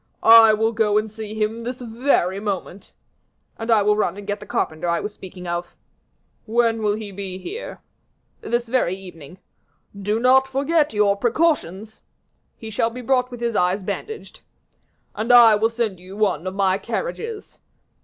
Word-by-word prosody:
"I 225 -1 +9
will 220 +1 +1
go 215 -2 +1
and 215 0 -1
see 215 0 -7
him 220 +1 -2
this 250 +2 -5
very 230 -6 0
moment." 200 -2 -5 0.7
"And 225 +1 -5
I 220 -3 +4
will 210 +1 +3
run 200 -3 -1
and 205 - -8
get 205 0 -3
the - - -11
carpenter 155 +2 -2
I 170 - +1
was 210 - -5
speaking 185 -2 -11
of." 175 0 -4 0.7
"When 225 0 +1
will 210 -1 +1
he 215 -2 -7
be 190 -1 -6
here?" 405 - -8 0.6
"This 240 0 -2
very 230 -7 0
evening." 180 -4 -12 0.6
"Do 205 +2 -2
not 260 +2 +4
forget 285 +4 +1
your 210 -2 +2
precautions." 225 - -1 0.6
"He 220 -1 -8
shall 225 +2 0
be 250 +2 -8
brought 250 0 +1
with 245 -1 -9
his 235 -2 -1
eyes 185 +2 +1
bandaged." 320 - -6 0.7
"And 220 +4 -1
I 235 -2 +8
will 215 +2 +2
send 225 -5 -3
you 185 +2 -11
one 190 -5 0
of 185 - -4
my 195 -1 +1
carriages." 455 - -5
215 Hz, 170 wpm, -22 LUFS, 195-240 Hz, 0.7 s, I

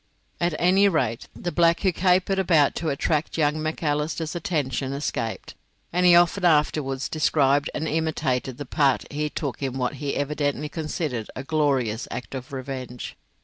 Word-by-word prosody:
At 175 -2 0
any 190 +3 +4
rate, 125 - -1
the 175 - -4
black 170 0 +3
who 190 - +3
capered 185 +2 +2
about 165 -6 +4
to 165 - -2
attract 150 +3 -1
young 155 0 +1
Macalister's 155 0 -2
attention 140 -6 -2
escaped, 130 -5 -3 0.4
and 180 +1 +3
he 175 - +8
often 175 +3 +4
afterwards 150 -4 +2
described 145 -2 +2
and 160 +1 -2
imitated 135 -6 -1
the 145 - -6
part 140 0 +2
he 150 +1 -2
took 145 -3 -4
in 135 -1 -2
what 130 +2 -2
he 145 -1 -2
evidently 145 +1 -1
considered 155 -7 -3
a 130 - -5
glorious 135 -7 0
act 125 - -6
of 130 0 -7
revenge. 130 -2 -6
150 Hz, 155 wpm, -24 LUFS, 135-165 Hz, 0.4 s, he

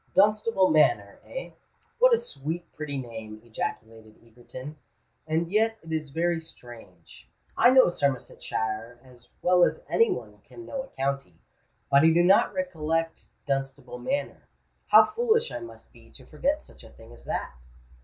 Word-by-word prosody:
"Dunstable 210 -1 +3
Manor—eh? 130 - +1 0.5
What - - +6
a 470 - +6
sweet 170 - -6
pretty 150 -2 -5
name!" 110 -4 -7
ejaculated 110 -1 -6
Egerton. 130 +5 -10 0.5
"And 165 +2 -1
yet 225 +2 +2
it 165 - -10
is 155 -2 -2
very 165 +3 0
strange—I 115 - -4
know 260 0 +7
Somersetshire 120 -6 -3
as 125 -2 -18
well 180 0 +5
as - - 0
any 460 - +3
one - - -5
can 350 - -13
know 275 -5 -4
a 265 - -10
county; 135 - -3 0.6
but 140 0 +6
I - - +4
do 170 +2 +4
not 190 +3 +5
recollect 165 -3 -2 0.2
Dunstable 135 -2 -3
Manor. 280 - -3 0.4
How - - +8
foolish 460 +1 +1
I - - -4
must 345 +2 -12
be - - -18
to - - -13
forget 295 +2 -1
such - - -15
a 115 - -13
thing 115 +1 -16
as 120 - -14
that." 65 - -4
155 Hz, 150 wpm, -27 LUFS, -, 0.6 s, How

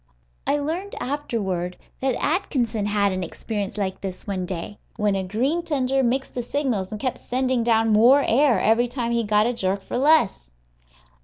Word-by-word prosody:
I 285 - +3
learned 335 +8 -3
afterward 200 -11 -2 0.2
that 265 -2 0
Atkinson 245 - 0
had 205 -1 +2
an 185 0 -2
experience 205 +3 -4
like 190 -2 -2
this, 190 -2 -6
one 185 -3 -3
day, 185 +3 -6 0.2
when 210 -2 +1
a 190 - -1
green 250 - 0
tender 270 -5 0
mixed 265 +2 0
the 245 - -2
signals 240 -7 -2
and 215 - -5
kept 255 +1 -2
sending 255 -1 0
down 225 -1 +3
more 250 +7 +6
air 250 -3 +4
every 225 +4 +3
time 240 -1 -3
he 235 0 +1
got 210 0 +3
a 240 - +1
jerk 195 -3 -1
for 245 - -3
less. 265 - +3
230 Hz, 175 wpm, -23 LUFS, 200-265 Hz, 0.2 s, more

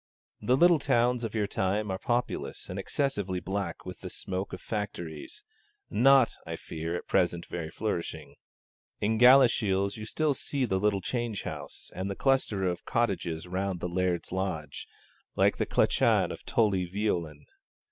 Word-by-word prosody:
The 125 +1 +3
little 175 +1 +6
towns 125 -3 +2
of 115 -1 -4
your 105 -2 +1
time 100 +1 -1
are 95 - -3
populous 120 - -2
and 90 +2 -4
excessively 100 -6 -1
black 95 -2 -4
with 90 -1 -7
the - - -7
smoke 95 +1 -4
of 90 - -6
factories 85 -9 -5 0.5
not, 130 +3 +5
I - - -5
fear, 80 +1 -5
at - - -5
present 85 -1 +1
very 80 -3 -5
flourishing. 95 -1 -4 0.7
In 110 +1 +1
Galashiels 115 -6 +5
you 110 0 -7
still 155 +2 +1
see 135 0 -1
the 95 -5 0
little 100 -1 +1
change 120 0 -2
house - - -7
and 95 +2 -3
the 100 - -3
cluster 130 -7 +1
of 90 -1 -2
cottages 90 -8 -1
round 95 0 -2
the 90 - -2
Laird's 90 0 -1
lodge, 90 -6 -3 0.5
like - - +3
the - - -1
clachan - - +3
of - - -9
Tully 95 -5 +2
Veolan. 85 -7 -2
100 Hz, 155 wpm, -29 LUFS, 90-115 Hz, 0.7 s, little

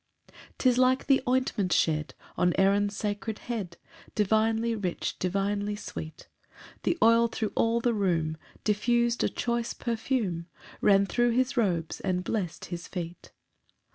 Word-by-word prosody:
2 - - -25 0.2
'Tis 250 -2 +3
like 255 +1 +3
the 270 -1 +4
ointment 250 -7 +1
shed 155 -2 +1 0.2
On 180 -1 +2
Aaron's 200 +1 +3
sacred 210 +1 -3
head, 210 -8 -5 0.4
Divinely 220 +2 +2
rich, 195 -6 -3
divinely 200 +2 -1
sweet; 160 -6 -8 0.5
The 340 - 0
oil, 230 +1 +6
thro' 220 -2 -3
all 230 +1 +2
the 240 0 +2
room, 165 -6 0 0.3
Diffus'd 235 +3 +2
a - - +2
choice 235 -1 -2
perfume, 225 -8 -2 0.3
Ran 200 -1 +5
thro' 240 +4 +2
his 255 +3 +1
robes, 175 -9 0
and 180 -1 -1
blest 185 -5 -3
his 170 0 -6
feet. 175 -2 -7
210 Hz, 140 wpm, -28 LUFS, 185-235 Hz, 0.5 s, oil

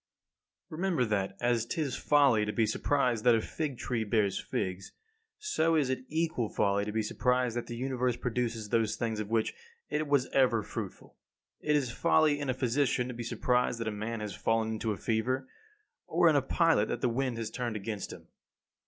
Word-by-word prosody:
15. 155 - -6
Remember 175 -10 +2
that, 100 -3 -1
as 120 -2 +1
'tis 140 +1 -2
folly 140 -7 +4
to 105 - -1
be 115 +1 +2
surprised 125 -2 +1
that 120 -2 +6
a - - +2
fig 140 +3 -4
tree 120 -2 -2
bears 105 -2 +1
figs, 95 +1 -4 0.4
so 165 - +1
is 140 -4 +2
it 130 0 -3
equal 160 -8 -1
folly 100 0 +1
to 105 - -3
be 110 +1 0
surprised 125 +2 +1
that 120 - -3
the 120 - -5
Universe 125 -1 -1
produces 115 -3 -2
those 115 -1 +1
things 110 -2 -2
of 105 -1 -4
which 115 -1 +1 0.4
it 155 0 0
was 140 -3 +3
ever 125 -5 +3
fruitful. - - -7 0.4
It 150 0 +1
is 135 -5 +1
folly 155 +1 +3
in 140 -2 -3
a 130 - +1
physician 130 0 +1
to - - -4
be 120 - -6
surprised 125 +1 0
that 115 - -3
a - - 0
man 110 +2 -4
has 105 -2 -4
fallen 115 0 0
into 110 0 -2
a 105 - -3
fever; 125 +6 -1 0.6
or 170 +1 +3
in 155 - +5
a 140 - +4
pilot 160 -5 +2
that - - -3
the - - +2
wind 125 0 -1
has 115 -1 -4
turned 120 -2 -3
against 105 -1 -4
him. - - -11
120 Hz, 200 wpm, -30 LUFS, 110-135 Hz, 0.6 s, that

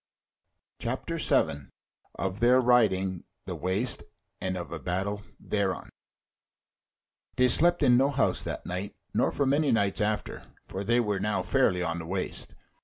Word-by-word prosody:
CHAPTER - - -3
7 70 -1 +1 0.5
Of 95 +1 -3
Their 125 +2 +5
Riding 95 -7 +2 0.2
the - - -4
Waste, 95 +7 -1 0.4
and 95 0 -2
of 85 - -6
a 85 - -5
Battle 95 +5 -2 0.2
Thereon 100 -3 -2 1.5
They 125 0 +4
slept 175 +7 +5
in 120 -1 +5
no 135 +2 +3
house 140 -1 +1
that - - -5
night 90 +3 -5 0.2
nor - - +2
for 140 - 0
many 145 +2 +2
nights 100 -3 +1
after; 105 0 -2 0.2
for 95 - -5
they 120 +4 +2
were 105 -4 0
now 100 -2 -1
fairly 90 0 +2
on 85 0 -2
the 80 - -7
waste. - - -4
100 Hz, 150 wpm, -28 LUFS, 95-120 Hz, 1.5 s, Their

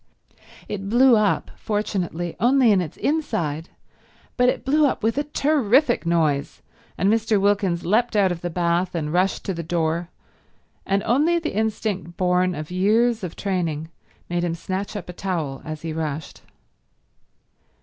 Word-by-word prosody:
It 195 -1 -5
blew 245 +2 +6
up, 210 -2 +1
fortunately, 185 -5 -2
only 245 +2 +4
in 195 -3 +4
its 165 -2 -6
inside, 185 - -1 0.7
but 250 0 +4
it - - -2
blew 295 +2 +4
up 260 - -3
with 225 +1 +1
a - - 0
terrific 275 - +2
noise, 155 -4 0 0.3
and 190 - +1
Mr. 220 0 +2
Wilkins 195 -3 +1
leapt 220 +5 +2
out 195 -3 +4
of 170 -1 -4
the 175 - -3
bath 175 +1 0
and 155 -2 -2
rushed 185 +2 +1
to 195 - -1
the 170 - -4
door, 170 0 -1 0.8
and 195 +1 +1
only 300 +9 +2
the 330 -2 -3
instinct 205 -5 -2
born 180 0 +2
of 155 +2 -6
years 220 +5 +2
of 175 -3 -5
training 165 -5 -2 0.4
made 175 0 -1
him 170 -1 -1
snatch 190 +4 -4
up 205 - -5
a 180 - -7
towel 165 -8 -3
as 155 0 -6
he 165 -1 -3
rushed. 155 -2 -4
190 Hz, 160 wpm, -23 LUFS, 170-220 Hz, 0.8 s, blew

